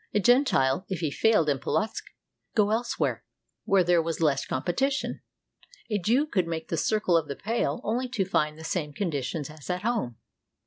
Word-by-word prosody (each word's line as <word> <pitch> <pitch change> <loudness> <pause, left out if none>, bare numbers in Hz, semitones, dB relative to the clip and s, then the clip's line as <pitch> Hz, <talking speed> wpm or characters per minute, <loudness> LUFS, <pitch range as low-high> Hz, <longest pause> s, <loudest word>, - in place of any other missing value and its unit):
A - - +5
Gentile, 210 - +3
if 185 -3 -3
he 155 -4 0
failed 210 -2 +3
in 140 -2 +1
Polotzk, 215 - -1
could - - -20
go 210 -1 +4
elsewhere, 235 +2 -1 0.4
where 195 -2 +4
there 175 -1 +4
was 165 0 -3
less 145 -4 +1
competition. 255 - -1 0.7
A 210 - +1
Jew 240 - +2
could 185 - 0
make 160 -1 -4
the - - 0
circle 180 +3 +1
of 165 -3 +2
the 140 - -4
Pale 230 +3 -1
only 245 +4 -1
to 220 -7 -1
find 155 -5 0
the 160 - -10
same 160 -3 -2
conditions 145 -3 -2
as 155 0 -12
at 180 +2 -2
home. 215 - -1
180 Hz, 185 wpm, -27 LUFS, 155-220 Hz, 0.7 s, A